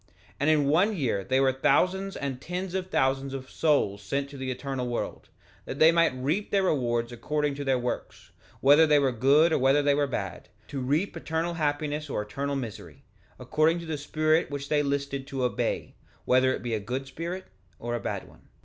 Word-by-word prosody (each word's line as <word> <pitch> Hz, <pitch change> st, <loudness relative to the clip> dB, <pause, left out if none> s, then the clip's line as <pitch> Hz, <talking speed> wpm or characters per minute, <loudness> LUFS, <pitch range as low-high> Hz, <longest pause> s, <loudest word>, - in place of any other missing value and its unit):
3:26 -, -, -30 dB
And 145 Hz, +2 st, +2 dB
in 150 Hz, -2 st, +4 dB
one 185 Hz, +9 st, +3 dB
year 105 Hz, -, -1 dB
were 130 Hz, 0 st, +4 dB
thousands 185 Hz, +9 st, +1 dB
and 135 Hz, -2 st, -4 dB
tens 180 Hz, +1 st, -4 dB
of 185 Hz, -1 st, -3 dB
thousands 135 Hz, -2 st, 0 dB
of 130 Hz, -1 st, -8 dB
souls 140 Hz, -11 st, +1 dB
sent 140 Hz, +8 st, -3 dB
to 140 Hz, -, -9 dB
the 130 Hz, -1 st, -4 dB
eternal 130 Hz, 0 st, -3 dB
world, 120 Hz, -, -4 dB, 0.4 s
that 135 Hz, -, -6 dB
they 160 Hz, +2 st, +7 dB
might 165 Hz, -5 st, +3 dB
reap 150 Hz, +11 st, -1 dB
their 195 Hz, -1 st, +2 dB
rewards 120 Hz, -8 st, 0 dB
according 145 Hz, +5 st, -1 dB
to 145 Hz, +1 st, -5 dB
their 135 Hz, -2 st, +2 dB
works, 125 Hz, 0 st, -5 dB, 0.3 s
whether 145 Hz, +4 st, +6 dB
they 150 Hz, -1 st, +5 dB
were 140 Hz, -2 st, +3 dB
good 140 Hz, +7 st, +4 dB
or -, -, +2 dB
whether 135 Hz, +3 st, +4 dB
they 145 Hz, 0 st, +4 dB
were 145 Hz, 0 st, +1 dB
bad, 100 Hz, -9 st, -5 dB, 0.2 s
to 140 Hz, -2 st, -4 dB
reap 150 Hz, +10 st, 0 dB
eternal 165 Hz, +2 st, -2 dB
happiness 150 Hz, -1 st, -2 dB
or 105 Hz, -, -2 dB
eternal 140 Hz, +7 st, -3 dB
misery, 120 Hz, -6 st, -7 dB, 0.3 s
according 155 Hz, +2 st, +2 dB
to 170 Hz, -, -7 dB
the 160 Hz, -1 st, -3 dB
spirit 155 Hz, +2 st, +1 dB
which 140 Hz, 0 st, -5 dB
they 150 Hz, -1 st, +3 dB
listed 140 Hz, -1 st, -2 dB
to 135 Hz, -2 st, -3 dB
obey, 125 Hz, -, -1 dB, 0.3 s
whether 130 Hz, +1 st, +4 dB
it -, -, -4 dB
be 120 Hz, -2 st, -2 dB
a 110 Hz, -, 0 dB
good 125 Hz, +6 st, -4 dB
spirit 170 Hz, +7 st, -5 dB, 0.3 s
or 120 Hz, 0 st, -4 dB
a 120 Hz, -, -1 dB
bad -, -, -4 dB
one. -, -, -20 dB
140 Hz, 205 wpm, -27 LUFS, 130-155 Hz, 0.4 s, they